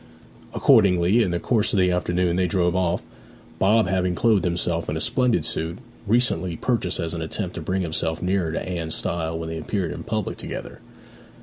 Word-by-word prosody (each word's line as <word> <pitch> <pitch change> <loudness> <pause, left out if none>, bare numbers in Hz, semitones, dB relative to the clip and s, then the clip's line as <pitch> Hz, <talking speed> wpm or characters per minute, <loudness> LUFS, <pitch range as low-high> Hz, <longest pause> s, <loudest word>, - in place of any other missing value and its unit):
Accordingly, 100 -3 +4
in 100 - +1
the 85 0 -1
course 110 0 +1
of 100 - +3
the 90 -1 +3
afternoon 90 0 0
they 90 0 +2
drove 90 -2 +1
off, 90 -1 0 0.6
Bob 105 +1 +4
having 90 -1 0
clothed 110 -3 +2
himself 85 -1 -1
in 75 - -1
a - - -2
splendid 120 -3 +1
suit, 80 +2 -3 0.3
recently 95 -7 +2
purchased 105 -6 0
as 80 0 -2
an 85 - -4
attempt 90 +3 -4
to - - -6
bring 95 +4 -1
himself 80 -1 -2
nearer 90 -2 0
to 80 - -4
Anne's 85 -3 -3
style 80 -1 -2
when 80 0 -5
they 80 0 -4
appeared 90 -1 -2
in - - -6
public 110 -2 -3
together. - - -7
90 Hz, 190 wpm, -23 LUFS, 85-100 Hz, 0.6 s, Accordingly